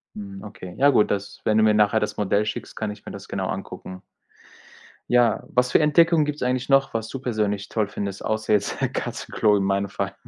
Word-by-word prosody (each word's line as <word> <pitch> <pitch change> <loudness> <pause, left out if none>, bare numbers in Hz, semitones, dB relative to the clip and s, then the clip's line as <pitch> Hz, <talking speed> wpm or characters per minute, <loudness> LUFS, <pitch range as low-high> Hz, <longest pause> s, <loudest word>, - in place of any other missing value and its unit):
Mhm, 100 -1 -8
okay. 95 -4 -9
Ja 140 +1 +5
gut, 115 -6 +3
das 100 0 -4
wenn 110 - +2
du 110 - +5
mir 110 -1 +5
nachher 105 +1 +3
das 105 0 -3
Modell 105 +1 +1
schickst, 105 - -5
kann 110 -1 -3
ich 105 - -12
mir - - -7
das - - -9
genau - - -3
angucken. 95 0 -6 1.1
Ja, 120 -2 +3
was 125 +1 +1
für - - +5
Entdeckungen 160 +1 +4
gibt's 150 0 -4
eigentlich 125 0 0
noch, 135 -2 +3
was 110 -1 -2
du 135 - -6
persönlich 105 -5 -2
toll 110 -3 0
findest, 100 -1 -5
außer 110 0 -1
jetzt 105 -1 +1 0.2
Katzenklo 105 -2 0
in 100 - +1
meinem 100 +1 0
Fall? 100 0 -4
105 Hz, 210 wpm, -24 LUFS, 100-125 Hz, 1.1 s, Ja